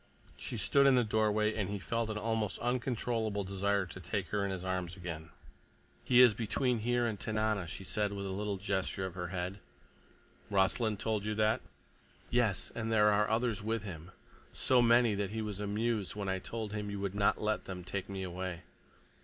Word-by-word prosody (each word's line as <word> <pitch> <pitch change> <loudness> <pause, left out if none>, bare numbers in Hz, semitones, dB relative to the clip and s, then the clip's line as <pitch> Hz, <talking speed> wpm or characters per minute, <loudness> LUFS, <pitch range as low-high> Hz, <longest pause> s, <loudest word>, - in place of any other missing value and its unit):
She 120 - -4
stood 140 +7 +4
in 135 - +6
the 125 - +4
doorway, 110 0 +2
and 100 -4 -2
he 100 - -2
felt 115 +3 -2
an 110 - -2
almost 110 -1 -1
uncontrollable 120 -4 -1
desire 100 +1 0
to 95 - -8
take 95 +1 -3
her 105 -1 0
in 100 - -1
his 95 -1 -4
arms 90 -1 -2
again. 85 -3 -6 0.7
"He 125 -1 +6
is 120 -3 +8
between 120 +3 0
here 120 +2 +1
and 110 -4 -2
Tanana," 110 -4 0
she 90 - -6
said 105 +1 0
with 100 -1 -4
a 95 - -3
little 100 +1 -2
gesture 95 -1 -1
of 95 - -5
her 90 0 -4
head. 90 +2 -4 0.9
"Rossland 105 +2 +2
told 110 -2 0
you 105 0 -2
that?" 110 +3 +2 0.7
"Yes. 120 -5 +1
And 115 -1 -3
there 105 -1 +5
are 105 +1 +2
others 110 -1 +1
with 110 0 -1
him, 85 -4 -7 0.4
so 125 -1 +3
many 120 -1 +5
that 100 -1 -1
he 110 +2 -3
was 105 -2 -4
amused 105 0 -1
when 100 -1 -3
I 95 0 0
told 110 +1 -5
him 105 -1 -3
you 100 -1 -4
would 100 -1 -2
not 100 0 +2
let 110 0 -1
them 90 -1 -6
take 95 +2 -4
me 95 -1 -4
away." 90 -1 -4
105 Hz, 195 wpm, -33 LUFS, 95-110 Hz, 0.9 s, is